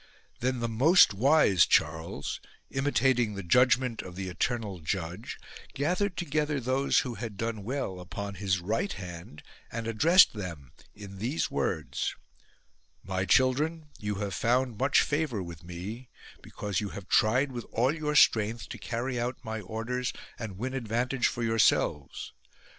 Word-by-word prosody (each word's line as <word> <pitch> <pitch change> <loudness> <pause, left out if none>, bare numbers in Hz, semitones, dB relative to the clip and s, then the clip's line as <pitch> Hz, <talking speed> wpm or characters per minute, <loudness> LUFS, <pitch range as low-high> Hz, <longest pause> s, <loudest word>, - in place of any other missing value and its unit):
Then 130 0 -1
the 115 - 0
most 135 - +5
wise 115 - +5
Charles, 80 0 0 0.3
imitating 130 -5 +2
the 100 - -5
judgment 125 +4 +3
of 90 -1 -10
the 95 0 -4
eternal 105 0 -2
Judge, 85 +5 -4 0.4
gathered 180 +6 0
together 150 -2 0
those 130 +3 +2
who 125 - -4
had 110 -2 -6
done 115 -2 -3
well 115 -6 -3
upon 100 +3 -6
his 95 -1 -1
right 110 - -1
hand 85 -4 -8 0.3
and 115 0 -4
addressed 160 - +5
them 85 - -7 0.2
in 100 -2 -10
these 125 +10 -1
words: - - -2 0.9
My 95 0 -2
children, 150 - +2
you 105 0 -2
have 100 -1 -3
found 120 -1 +1
much 135 +1 +4
favour 145 -9 -1
with 85 -2 -9
me 95 +9 -7 0.3
because 105 -1 -3
you 105 - -3
have 95 -2 -9
tried 125 +9 +3
with 120 -2 -6
all 125 +5 +2
your 150 -2 -2
strength 110 -4 +4
to - - -7
carry 125 +2 -3
out 125 +1 -2
my 110 0 -3
orders 115 +5 -3 0.3
and 105 -5 -6
win 130 +5 -3
advantage 125 +1 0
for 120 - -3
your 115 0 0
selves. 75 -8 +1
115 Hz, 150 wpm, -29 LUFS, 100-130 Hz, 0.9 s, most